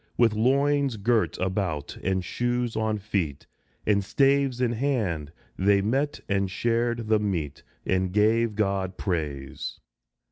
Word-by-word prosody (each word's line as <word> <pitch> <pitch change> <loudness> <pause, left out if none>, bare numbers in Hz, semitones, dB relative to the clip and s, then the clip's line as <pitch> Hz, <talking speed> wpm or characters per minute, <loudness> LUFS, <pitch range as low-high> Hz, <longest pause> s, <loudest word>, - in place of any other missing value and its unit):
With 115 -3 +4
loins 135 +2 +2
girt 110 +2 +1
about, 90 -6 -2
and 95 -1 -1
shoes 120 +2 -1
on 110 -1 0
feet, 95 -8 -2 0.4
And 100 -1 +3
staves 135 +2 +2
in 125 -2 +2
hand, 110 - -1 0.3
they 100 +1 +4
met 135 +7 0
and 100 -1 +1
shared 115 +2 0
the 110 -1 +3
meat, 85 -9 -2 0.2
And 95 -1 +1
gave 110 +2 +2
God 95 -3 -1
praise. 75 -7 -3
105 Hz, 130 wpm, -26 LUFS, 95-120 Hz, 0.4 s, With